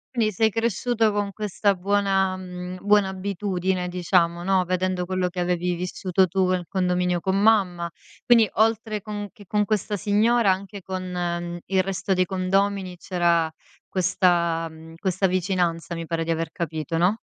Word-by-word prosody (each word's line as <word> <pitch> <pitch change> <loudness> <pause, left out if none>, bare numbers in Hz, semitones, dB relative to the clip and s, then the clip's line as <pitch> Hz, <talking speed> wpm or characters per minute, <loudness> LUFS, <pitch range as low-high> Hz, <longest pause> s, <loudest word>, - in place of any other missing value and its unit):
Quindi, 220 -2 +2
sei 220 +3 +2
cresciuto 230 0 +1
con 205 -1 -1
questa 205 -1 0
buona 195 0 +1
mhmm, 180 0 -7
buona 205 -2 +4
abitudine 190 -1 -2
diciamo, 175 -1 +1
no, 190 -1 +2
vedendo 185 0 -1
quello 185 0 -1
che 180 0 -6
avevi 180 0 0
vissuto 180 +1 0
tu 190 +2 +1
nel 180 -2 0
condominio 180 -1 0
con 190 +2 0
mamma, 185 -6 +3 0.4
quindi, 235 -3 +6
oltre 220 -1 +1
con 205 -1 -5
che 205 - -15
con 210 +1 +1
questa 210 -1 -1
signora, 210 +2 +3
anche 195 +1 -4
con, 185 0 -5
mhmm, 175 -1 -3
il 190 -1 +1
resto 195 0 -1
dei 185 0 +2
condomini, 190 0 0
c'era 170 -3 +1 0.4
questa 175 -3 +1
mhmm, 160 +1 -13
questa 190 +2 0
vicinanza, 175 -2 -1
mi 165 0 -5
pare 165 0 -2
di 165 - -2
aver 165 0 -2
capito, 165 -2 -3
no? 180 +6 +3
185 Hz, 160 wpm, -24 LUFS, 175-200 Hz, 0.4 s, quindi